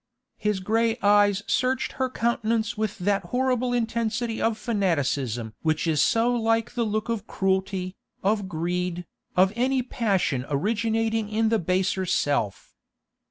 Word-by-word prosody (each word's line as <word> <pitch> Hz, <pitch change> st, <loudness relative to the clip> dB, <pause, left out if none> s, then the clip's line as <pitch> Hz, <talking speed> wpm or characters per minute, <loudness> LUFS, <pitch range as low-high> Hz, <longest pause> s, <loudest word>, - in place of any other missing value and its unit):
His 210 Hz, -2 st, 0 dB
grey 225 Hz, +3 st, +1 dB
eyes 205 Hz, 0 st, +4 dB
searched 255 Hz, +1 st, 0 dB
her 260 Hz, -1 st, -1 dB
countenance 230 Hz, -1 st, 0 dB
with 215 Hz, -2 st, -2 dB
that 195 Hz, 0 st, 0 dB
horrible 250 Hz, +3 st, 0 dB
intensity 230 Hz, -1 st, -1 dB
of 225 Hz, -1 st, +1 dB
fanaticism 140 Hz, -, -1 dB
which 155 Hz, 0 st, 0 dB
is 155 Hz, -3 st, +2 dB
so 230 Hz, +2 st, +3 dB
like 225 Hz, -1 st, +1 dB
the 240 Hz, -, -1 dB
look 215 Hz, +1 st, -1 dB
of 225 Hz, -2 st, -3 dB
cruelty, 190 Hz, -1 st, -1 dB, 0.3 s
of 200 Hz, -1 st, +1 dB
greed, 175 Hz, +1 st, -2 dB, 0.3 s
of 190 Hz, +2 st, +5 dB
any 255 Hz, +2 st, +1 dB
passion 195 Hz, -, 0 dB
originating 220 Hz, +6 st, 0 dB
in 220 Hz, +1 st, +1 dB
the 225 Hz, -1 st, +2 dB
baser 185 Hz, +2 st, 0 dB
self. 140 Hz, -, -1 dB
210 Hz, 135 wpm, -25 LUFS, 185-230 Hz, 0.3 s, of